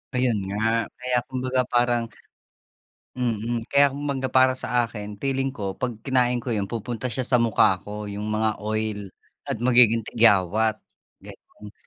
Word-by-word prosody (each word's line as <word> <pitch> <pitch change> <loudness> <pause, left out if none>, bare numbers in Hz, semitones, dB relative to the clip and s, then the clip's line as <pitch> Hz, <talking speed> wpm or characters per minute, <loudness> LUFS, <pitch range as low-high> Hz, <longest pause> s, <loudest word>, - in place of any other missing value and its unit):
Ayun 125 -4 +1
nga, 115 +3 0
kaya 125 0 0
kumbaga 130 0 -1
parang 120 -1 +2 1.1
mm, 120 -1 -2
kaya 140 0 +6
kumbaga 140 -2 -2
para 130 0 +4
sa 125 -1 +1
akin, 105 -3 -6
feeling 135 -1 -1
ko, 95 -3 -5
'pag 120 -2 -2
kinain 125 -2 +1
ko 125 - -4
yung 100 -3 -1
pupunta 120 +2 -4
siya 130 +2 -1
sa 125 0 +2
mukha 110 -4 +3
ko, 105 0 -6
yung 105 +1 -5
mga 110 0 0
oil, 110 -1 -3 0.4
at - - -2
magiging 120 -2 +5
tigyawat, 110 -1 +3 0.5
gano'n. 105 0 -13
115 Hz, 145 wpm, -24 LUFS, 105-125 Hz, 1.1 s, kaya